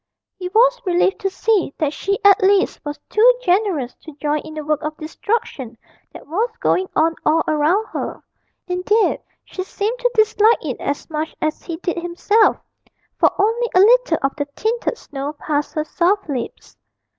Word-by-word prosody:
He 365 -2 -6
was - - +3
relieved 365 +1 +1
to 390 - -1
see 385 -5 0
that 300 -2 -1
she 395 +5 -1
at 400 -1 +7
least 390 0 +2
was 295 0 -5
too 470 +4 +5
generous 360 - +1
to 315 -3 -12
join 300 0 0
in 310 +1 -10
the 305 -1 -5
work 305 -1 0
of 305 0 -5
destruction 310 - -4 0.3
that - - -12
was 415 +11 -1
going 370 0 +1
on 325 +1 +3
all 325 +1 +3
around 310 +8 +2
her - - -5 0.4
indeed, 370 +5 +1 0.2
she 370 - -6
seemed 415 +5 -3
to - - +2
dislike 435 -1 +3
it 260 -5 -4
as 285 - -3
much 310 +1 -3
as 310 0 -2
he 335 -2 -6
did 350 0 -3
himself, 350 +6 +2 0.6
for - - +5
only 455 +4 +1
a - - +6
little 455 -4 +5
of 275 - 0
the 285 - -1
tinted 470 +2 -1
snow 280 +1 -6
passed 295 0 -3
her 305 - 0
soft 365 +5 0
lips. 255 -6 -6
360 Hz, 175 wpm, -20 LUFS, 305-425 Hz, 0.6 s, at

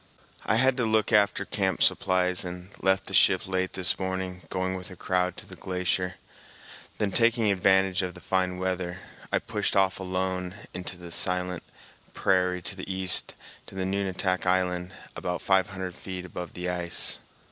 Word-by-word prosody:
I - - +3
had 130 +2 +4
to 125 - +1
look 110 -1 +2
after 105 -1 +4
camp 95 -4 0
supplies 90 -1 +2
and 90 +1 -7
left 95 0 +2
the - - -7
ship - - +5
late 95 -1 -1
this 95 -2 +2
morning, 95 -1 -3
going 95 0 -1
with 90 +1 -5
a 90 - -9
crowd 90 0 0
to - - -8
the - - -10
glacier; 90 0 -1 0.8
then, 105 -2 0
taking 115 -1 +3
advantage 95 0 +3
of 90 -2 -4
the - - -10
fine 95 -1 0
weather, 90 -1 -2 0.3
I - - +3
pushed - - -1
off 95 -1 +3
alone 95 0 -2 0.2
into 90 0 -5
the 85 -1 -10
silent 90 0 -1
icy - - -24
prairie 90 -1 +2
to 100 - -5
the 95 0 -5
east, 95 -1 +3 0.3
to - - -12
Nunatak 95 -1 -1
Island, 90 -1 +1 0.2
about 90 0 -2
five 95 -1 +3
hundred 95 -2 -4
feet 90 0 -6
above 90 -1 -7
the 90 0 -4
ice. 90 -1 -1
95 Hz, 170 wpm, -27 LUFS, 90-95 Hz, 0.8 s, ship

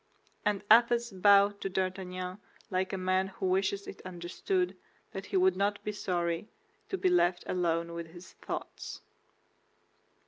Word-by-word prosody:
And 205 -1 0
Athos 235 +1 +6
bowed 200 +1 +5
to 195 - -2
D'Artagnan 185 0 -3 0.3
like 185 0 0
a 195 - -2
man 185 +1 +1
who 190 0 -5
wishes 190 +2 +1
it - - -9
understood 185 - -2 0.4
that - - -6
he 390 - 0
would 375 0 +4
not 205 +1 0
be 210 - -2
sorry 175 -1 -2 0.4
to 385 - -1
be 375 - +1
left 185 - +3
alone 170 -2 0
with 170 -1 -5
his 175 +2 -13
thoughts. - - -6
190 Hz, 145 wpm, -31 LUFS, 180-210 Hz, 0.4 s, Athos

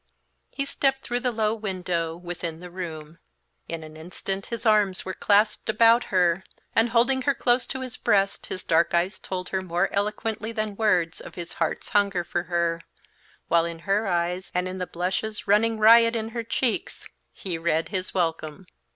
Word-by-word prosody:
He 275 - -3
stepped 270 -1 0
through 245 0 -1
the 250 0 0
low 220 -1 +1
window, 180 -6 -2
within 175 -2 -6
the 180 0 -10
room. 165 -3 -7 0.5
In 165 -1 -5
an 155 0 -11
instant 185 +4 -5
his 235 0 -5
arms 210 -4 +3
were 185 - -3
clasped 210 +3 +2
about 230 +2 +5
her, 180 -1 +2 0.3
and, 225 +1 +4
holding 245 +3 +3
her 280 +1 +1
close 245 0 +2
to 265 - -5
his 255 -1 -6
breast, 195 -1 +1
his 185 - -5
dark 170 +1 +2
eyes 180 +3 0
told 185 -1 -5
her 190 - -1
more 175 +1 -1
eloquently 215 +2 -2
than 215 -2 -3
words 185 -6 +1
of - - -11
his 170 -1 -7
heart's 165 - -1
hunger 200 -3 +2
for 175 - -2
her, 170 -1 0 0.7
while 170 0 +4
in 170 0 -4
her 200 +2 +1
eyes 175 +1 -1
and 180 0 +1
in 185 0 -5
the 180 - -3
blushes 190 +5 -3
running 220 +3 +3
riot 230 +2 +7
in 225 -1 -2
her 235 +1 -3
cheeks 255 - -2 0.2
he 175 -4 -5
read 165 -1 0
his 185 -2 -3
welcome. 165 -1 -2
190 Hz, 180 wpm, -25 LUFS, 175-220 Hz, 0.7 s, riot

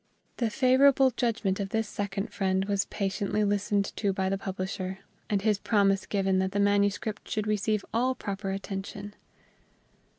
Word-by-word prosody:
The 235 -3 +1
favorable 265 +3 +5
judgment 225 -5 0
of 195 -1 -2
this 225 +1 -1
second 205 +1 -4
friend 190 -1 +1
was 200 -1 0
patiently 200 +1 -1
listened 205 0 0
to 200 -2 +1
by 190 0 -1
the 195 - 0
publisher, 185 -1 -4 0.3
and 200 -2 0
his 210 -2 +2
promise 200 -3 +2
given 195 -2 +1
that 190 +1 -1
the 205 - 0
manuscript 205 +1 +1
should 215 -1 -1
receive 215 0 0
all 255 +3 +2
proper 195 -3 -4
attention. 195 +1 -5
200 Hz, 155 wpm, -28 LUFS, 195-215 Hz, 0.3 s, favorable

